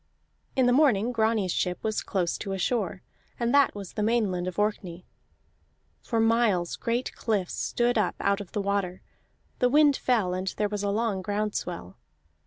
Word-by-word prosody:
In 260 Hz, -, +3 dB
the 245 Hz, -, +4 dB
morning 250 Hz, -6 st, +3 dB
Grani's 220 Hz, -5 st, +1 dB
ship 180 Hz, +1 st, -1 dB
was 215 Hz, -1 st, -1 dB
close 180 Hz, -3 st, -1 dB
to 195 Hz, -2 st, -4 dB
a -, -, -2 dB
shore, 190 Hz, -2 st, -1 dB, 0.4 s
and 235 Hz, 0 st, 0 dB
that 280 Hz, -5 st, +4 dB
was 200 Hz, -3 st, -8 dB
the 215 Hz, -, -3 dB
Mainland 210 Hz, -5 st, +1 dB
of 185 Hz, -, -5 dB
Orkney. 190 Hz, -4 st, -2 dB, 1.0 s
For 230 Hz, -, -1 dB
miles 225 Hz, -6 st, +2 dB
great 235 Hz, +2 st, -2 dB
cliffs 205 Hz, -6 st, -1 dB
stood 240 Hz, -1 st, 0 dB
up 205 Hz, -, 0 dB
out 200 Hz, +1 st, +1 dB
of 195 Hz, -, -11 dB
the 210 Hz, -, -1 dB
water, 195 Hz, -2 st, -2 dB, 0.6 s
the 250 Hz, -, +3 dB
wind 290 Hz, +1 st, +5 dB
fell, 220 Hz, -10 st, +1 dB
and 185 Hz, +1 st, -3 dB
there 210 Hz, -1 st, 0 dB
was 205 Hz, -1 st, -3 dB
a 205 Hz, -, -1 dB
long 210 Hz, -2 st, 0 dB
ground 205 Hz, +2 st, -2 dB
swell. 170 Hz, -, -5 dB
210 Hz, 180 wpm, -27 LUFS, 185-235 Hz, 1.0 s, wind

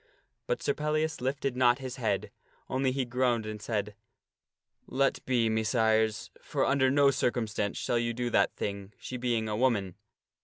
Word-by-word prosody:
But -, -, -1 dB
Sir -, -, +2 dB
Pellias 155 Hz, 0 st, -1 dB
lifted 135 Hz, 0 st, -1 dB
not 125 Hz, -1 st, +4 dB
his 130 Hz, -2 st, -6 dB
head, 110 Hz, -6 st, -1 dB, 0.4 s
only 130 Hz, 0 st, +1 dB
he 130 Hz, 0 st, -1 dB
groaned 120 Hz, -2 st, +1 dB
and 110 Hz, -1 st, -6 dB
he -, -, -11 dB
said, 105 Hz, -2 st, -2 dB, 0.5 s
" -, -, -63 dB, 0.2 s
Let 135 Hz, +1 st, +1 dB
be, 120 Hz, -3 st, +2 dB
Messires; 110 Hz, 0 st, +1 dB
for -, -, -1 dB
under 135 Hz, -1 st, +3 dB
no 140 Hz, +1 st, +5 dB
circumstance 115 Hz, -5 st, -1 dB
shall 120 Hz, -, 0 dB
ye 120 Hz, 0 st, 0 dB
do 120 Hz, +1 st, -2 dB
that 100 Hz, -, +2 dB
thing, 100 Hz, 0 st, -4 dB
she 125 Hz, -, -6 dB
being 120 Hz, -3 st, 0 dB
a 105 Hz, -, -2 dB
woman. 105 Hz, -6 st, +1 dB
120 Hz, 175 wpm, -29 LUFS, 110-130 Hz, 0.5 s, no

